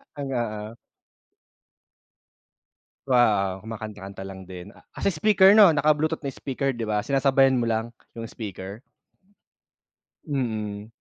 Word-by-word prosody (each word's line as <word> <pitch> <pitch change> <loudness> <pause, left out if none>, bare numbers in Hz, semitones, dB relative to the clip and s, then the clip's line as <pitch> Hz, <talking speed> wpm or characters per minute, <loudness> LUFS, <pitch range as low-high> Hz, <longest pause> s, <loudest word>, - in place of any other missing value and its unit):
Talaga, 135 -3 -3 0.2
ah. 110 +2 -8 2.3
Wow, 105 -7 +2
kumakanta-kanta 105 -3 -8
lang 95 -1 -9
din. 90 +2 -10 0.2
Kasi 200 - 0
speaker 190 +3 +5
'no, 205 -6 +7
naka 150 +1 +4
bluetooth 155 +1 -1
na 135 - -3
speaker, 135 +1 -3
'di 115 -3 -5
ba? 105 -1 0
Sinasabayan 135 -1 +3
mo 115 - -1
lang, 115 +1 -1 0.2
yung 115 - -6
speaker? 100 -1 -7 1.5
Mm. 110 -7 -3
115 Hz, 115 wpm, -25 LUFS, 105-140 Hz, 2.3 s, no